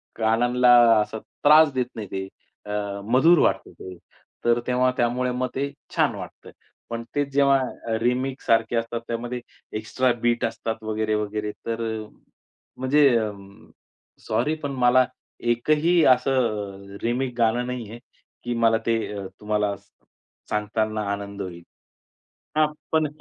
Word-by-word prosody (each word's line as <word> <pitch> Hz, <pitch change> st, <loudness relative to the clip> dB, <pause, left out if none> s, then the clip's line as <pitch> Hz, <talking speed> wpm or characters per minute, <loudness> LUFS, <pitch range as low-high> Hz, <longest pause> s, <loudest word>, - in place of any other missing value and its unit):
कानांना 120 Hz, +3 st, +3 dB, 0.3 s
असा 110 Hz, +1 st, -4 dB
त्रास 150 Hz, +6 st, +4 dB
देत 125 Hz, -2 st, 0 dB
नाही, 110 Hz, -2 st, -6 dB
ते 95 Hz, 0 st, -4 dB, 0.4 s
अ, 100 Hz, -1 st, -3 dB
मधुर 165 Hz, +7 st, +6 dB
वाटतं, -, -, +1 dB
ते 95 Hz, 0 st, -8 dB, 0.5 s
तर 120 Hz, 0 st, +4 dB
तेव्हा 125 Hz, 0 st, +3 dB
त्यामुळे 125 Hz, +1 st, +1 dB
मग 125 Hz, +1 st, -1 dB
ते 140 Hz, +1 st, -1 dB, 0.2 s
छान -, -, +2 dB
वाटतं. -, -, -10 dB, 0.4 s
पण 115 Hz, 0 st, -4 dB
ते 145 Hz, -, +2 dB
जेव्हा 135 Hz, -5 st, +1 dB
रिमेकसारखे 120 Hz, -2 st, +1 dB
असतात, 115 Hz, 0 st, -2 dB
त्यामध्ये 120 Hz, +1 st, -3 dB, 0.4 s
एक्स्ट्रा 125 Hz, +4 st, 0 dB
बीट 120 Hz, 0 st, +1 dB
असतात, 115 Hz, 0 st, -4 dB
वगैरे-वगैरे, 105 Hz, -1 st, -2 dB, 0.2 s
तर 115 Hz, 0 st, -2 dB
अ, 110 Hz, -1 st, -4 dB, 0.7 s
म्हणजे 140 Hz, +3 st, +4 dB
अ, 110 Hz, -2 st, -1 dB, 1.0 s
सॉरी 155 Hz, +2 st, +1 dB
पण 145 Hz, -, -2 dB
मला 125 Hz, +1 st, +6 dB, 0.5 s
एक 120 Hz, +4 st, -3 dB
ही 165 Hz, +3 st, +4 dB
असं 105 Hz, -7 st, -2 dB
रिमेक 125 Hz, +2 st, -1 dB
गाणं 120 Hz, +1 st, +2 dB
नाही 125 Hz, -4 st, -5 dB
आहे, 115 Hz, +2 st, -9 dB, 0.4 s
की 120 Hz, -, -2 dB
मला 115 Hz, 0 st, +5 dB
ते 115 Hz, -1 st, +2 dB, 0.2 s
अ, 100 Hz, -1 st, -5 dB, 0.2 s
तुम्हाला 105 Hz, -1 st, 0 dB
स -, -, -27 dB, 0.6 s
सांगताना 110 Hz, +1 st, -1 dB
आनंद 100 Hz, 0 st, -6 dB
होईल. 85 Hz, -2 st, -7 dB, 0.9 s
हां, 155 Hz, 0 st, +5 dB, 0.3 s
पण 160 Hz, -1 st, +3 dB
115 Hz, 135 wpm, -24 LUFS, 110-130 Hz, 1.0 s, मधुर